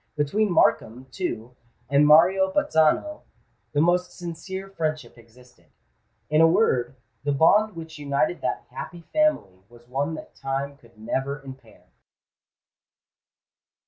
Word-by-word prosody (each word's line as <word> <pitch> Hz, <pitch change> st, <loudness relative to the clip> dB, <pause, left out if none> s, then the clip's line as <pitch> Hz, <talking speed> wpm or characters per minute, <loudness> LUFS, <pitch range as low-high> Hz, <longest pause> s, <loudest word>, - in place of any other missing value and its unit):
Between 185 Hz, +8 st, 0 dB
Markham, 125 Hz, -6 st, +1 dB
too, 125 Hz, -, -5 dB, 0.3 s
and 140 Hz, +2 st, +4 dB
Mario 185 Hz, +5 st, +5 dB
Bazzano 240 Hz, -, +1 dB, 0.5 s
the 145 Hz, -, +1 dB
most 180 Hz, +2 st, +1 dB
sincere 180 Hz, +3 st, -6 dB
friendship 155 Hz, -9 st, -4 dB
existed: 115 Hz, -5 st, -21 dB, 0.6 s
in 155 Hz, +1 st, +3 dB
a 165 Hz, -, +7 dB
word, 135 Hz, -, +1 dB, 0.3 s
the 145 Hz, -, 0 dB
bond 195 Hz, +8 st, +3 dB
which 160 Hz, -2 st, -9 dB
united 145 Hz, +4 st, -1 dB
that -, -, -3 dB
happy 175 Hz, -1 st, -8 dB
family 305 Hz, -, +1 dB
was 120 Hz, 0 st, -19 dB
one 140 Hz, +5 st, -2 dB
that -, -, -11 dB
time 135 Hz, +1 st, -4 dB
could 120 Hz, -4 st, -23 dB
never 135 Hz, +6 st, -3 dB
impair. 135 Hz, -1 st, -13 dB
150 Hz, 120 wpm, -24 LUFS, 130-175 Hz, 0.6 s, a